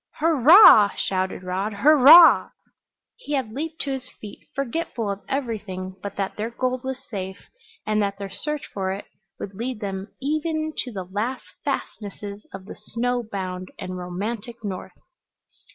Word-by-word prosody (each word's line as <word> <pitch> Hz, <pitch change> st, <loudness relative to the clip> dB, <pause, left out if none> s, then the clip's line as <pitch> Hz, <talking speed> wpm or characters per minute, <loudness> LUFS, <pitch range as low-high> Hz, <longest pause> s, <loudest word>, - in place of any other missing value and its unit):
"Hurrah!" 310 Hz, -, +8 dB
shouted 185 Hz, -1 st, -2 dB
Rod. 190 Hz, +4 st, -2 dB
"Hurrah 300 Hz, +8 st, +8 dB, 0.3 s
" -, -, -64 dB
He 470 Hz, -11 st, -6 dB
had 260 Hz, -6 st, -1 dB
leaped 315 Hz, +6 st, -5 dB
to 280 Hz, -, -3 dB
his 260 Hz, -1 st, -5 dB
feet, 210 Hz, -, -11 dB, 0.2 s
forgetful 250 Hz, -5 st, -2 dB
of 200 Hz, 0 st, -6 dB
everything 210 Hz, -8 st, -4 dB
but 200 Hz, -1 st, -6 dB
that 195 Hz, -1 st, -3 dB
their 215 Hz, +2 st, -2 dB
gold 255 Hz, +1 st, -2 dB
was 265 Hz, -1 st, -3 dB
safe, 190 Hz, -5 st, -7 dB, 0.4 s
and 215 Hz, 0 st, +1 dB
that 200 Hz, -1 st, -1 dB
their 200 Hz, 0 st, -5 dB
search 300 Hz, +8 st, -4 dB
for 190 Hz, -1 st, -2 dB
it 195 Hz, +1 st, -6 dB, 0.3 s
would 200 Hz, -, -6 dB
lead 235 Hz, +3 st, -4 dB
them 195 Hz, -2 st, -5 dB
even 310 Hz, +2 st, -2 dB
to 250 Hz, -, -3 dB
the 195 Hz, -4 st, -5 dB
last 215 Hz, +8 st, -3 dB, 0.2 s
fastnesses 205 Hz, 0 st, -5 dB
of 190 Hz, -1 st, -9 dB
the -, -, -9 dB
snow 245 Hz, +3 st, -2 dB
bound 185 Hz, -4 st, -5 dB
and 185 Hz, -, -6 dB
romantic 205 Hz, +6 st, -5 dB
North. 190 Hz, -3 st, -6 dB
215 Hz, 155 wpm, -23 LUFS, 195-265 Hz, 0.4 s, Hurrah